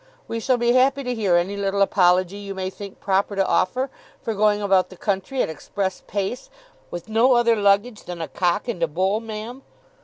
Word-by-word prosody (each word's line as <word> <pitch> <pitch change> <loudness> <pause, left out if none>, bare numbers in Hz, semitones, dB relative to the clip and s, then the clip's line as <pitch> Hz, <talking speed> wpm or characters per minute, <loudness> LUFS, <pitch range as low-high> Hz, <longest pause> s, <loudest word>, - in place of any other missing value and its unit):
We 230 - -3
shall 250 +2 +1
be 240 0 +2
happy 265 +2 +3
to 250 -1 -2
hear 205 -7 +1
any 175 +4 +1
little 200 0 +1
apology 185 0 +3
you 200 -1 -7
may 190 0 -3
think 200 0 -10
proper 195 +1 0
to 195 -1 +2
offer, 250 +11 +1 0.3
for 225 - -2
going 210 0 +2
about 195 -2 +2
the 185 - -13
country 200 +8 -1
at - - -1
express 190 +4 -4
pace, 205 +6 -3 0.4
with 175 -1 -7
no 225 +4 +4
other 235 -1 +4
luggage 205 +2 +1
than 175 -1 -6
a 165 - -3
Cock 180 +5 0
and 225 -8 -4
a 165 - +3
Bull, 190 +7 0
ma'am! 225 +3 -7
200 Hz, 205 wpm, -23 LUFS, 190-230 Hz, 0.4 s, no